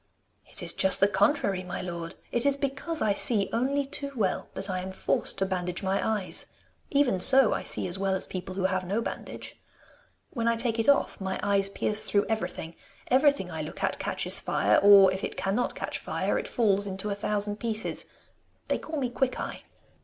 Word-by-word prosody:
'It - - -1
is - - +2
just 190 - +2
the 195 - +5
contrary, 200 -1 +1
my 180 0 -5
lord! 170 -1 -6 0.2
It 240 - 0
is 280 -1 +3
because 280 +4 -2
I 205 - +2
see 205 -1 +1
only 275 +4 0
too 280 +1 -2
well 200 -6 -1
that 195 0 -2
I 185 -2 -2
am 185 +1 -5
forced 190 - 0
to 195 - +1
bandage 180 -1 -3
my 190 +1 0 0.2
eyes. - - -2 0.4
Even 280 -9 +2
so 260 +5 +6
I - - -2
see - - 0
as 180 +2 -3
well 195 -1 +1
as 190 - -2
people 185 0 -6
who 190 - -2
have 185 0 0
no 195 +5 -1
bandage. - - -7 0.7
When 230 -3 -2
I 230 - +3
take 230 -1 -1
it 225 - +2
off 280 -7 +2
my 190 0 -3
eyes 200 -1 +2
pierce 210 +2 -1
through 205 0 +2
everything. 195 -6 -3 0.3
Everything 265 -7 +3
I 160 -1 -4
look 155 - -7
at - - 0
catches - - 0
fire, 105 +1 +2
or, 200 -2 +7
if 190 - -5
it - - -4
cannot 205 +6 -1
catch - - -4
fire, - - -1
it - - -5
falls 205 -4 +1
into 195 +2 -4
a - - +1
thousand 205 0 -2
pieces. 220 -1 -2 0.6
They - - +1
call 315 -1 -5
me 260 - 0
Quickeye. 255 +1 -2
200 Hz, 200 wpm, -27 LUFS, 190-240 Hz, 0.7 s, or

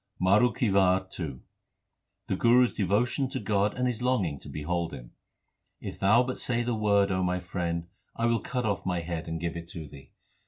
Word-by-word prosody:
MARU 100 +6 +4
KI 115 -5 0
WAR 95 -1 +3
II 70 -7 -5 0.8
The - - -1
Guru 120 +2 +5
s - - -4
devotion 115 - +1
to 135 -1 -3
God 105 -2 +1
and 125 - 0
his 125 -2 -1
longing 105 - 0
to - - -11
behold 85 +3 -2
Him: - - -11 0.7
If - - -7
Thou 110 +6 +5
but 130 0 -4
say 120 -1 0
the 120 0 -1
Word, 100 -2 +2
my 90 -1 0
Friend, 85 -2 -3 0.3
I 115 - 0
will 115 -1 +2
cut 125 -3 -3
off 100 -3 -1
my 90 -2 -1
head 85 -1 -5
and 80 0 -3
give 85 0 -3
it 85 0 -7
Thee. 70 -5 -10
95 Hz, 195 wpm, -28 LUFS, 85-115 Hz, 0.8 s, Guru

